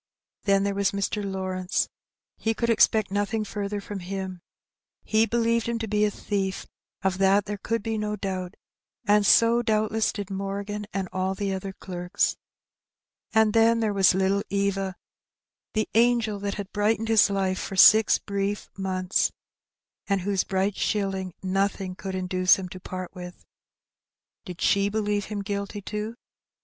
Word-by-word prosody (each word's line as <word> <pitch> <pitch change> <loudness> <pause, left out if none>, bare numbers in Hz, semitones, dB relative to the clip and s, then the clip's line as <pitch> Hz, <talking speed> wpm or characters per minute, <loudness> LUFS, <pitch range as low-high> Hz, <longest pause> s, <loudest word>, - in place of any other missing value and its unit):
Then 195 -1 +3
there 200 0 0
was 200 0 0
Mr. 200 +1 -1
Lawrence; 190 -1 -1 0.5
he 225 0 -1
could 235 0 +1
expect 215 -2 +3
nothing 205 +2 0
further 205 0 -3
from 200 0 -6
him. 190 0 -5 0.6
He 220 +1 +2
believed 230 0 +1
him 235 - -1
to 225 -1 -4
be 210 0 +2
a - - +2
thief, 195 -2 -3 0.4
of 190 0 0
that 195 +1 +4
there 205 0 -5
could 230 +1 -2
be 225 -1 -2
no 210 0 -2
doubt, 185 -2 -4 0.5
and 205 +1 +4
so 230 +2 +5
doubtless 220 -1 +1
did 200 -2 -6
Morgan 200 +2 -4
and 195 -1 -2
all 185 +1 -1
the 195 0 -2
other 190 +1 -4
clerks. 180 -2 -2 1.0
And 220 -1 +3
then 230 0 +4
there 220 -2 0
was 190 -2 +4
little 190 +1 +2
Eva, 195 -1 -1 0.8
the 215 - +1
angel 230 -2 +3
that 200 0 -3
had 200 -1 -6
brightened 220 +2 +1
his 220 -2 +5
life 190 -1 0
for 195 - -5
six 215 +3 +7
brief 200 0 -3
months, 185 0 0 0.8
and 195 -2 +1
whose 195 0 0
bright 195 +1 0
shilling 195 -3 -1
nothing 195 0 -1
could 190 +1 -6
induce 185 0 +3
him 190 -1 -5
to 185 - -9
part 185 0 -7
with. 180 -1 -10 1.0
Did 180 -3 -8
she 200 0 +3
believe 205 -1 -1
him 205 -1 -4
guilty 200 +1 -4
too? 210 +3 -5
200 Hz, 160 wpm, -26 LUFS, 190-210 Hz, 1.0 s, six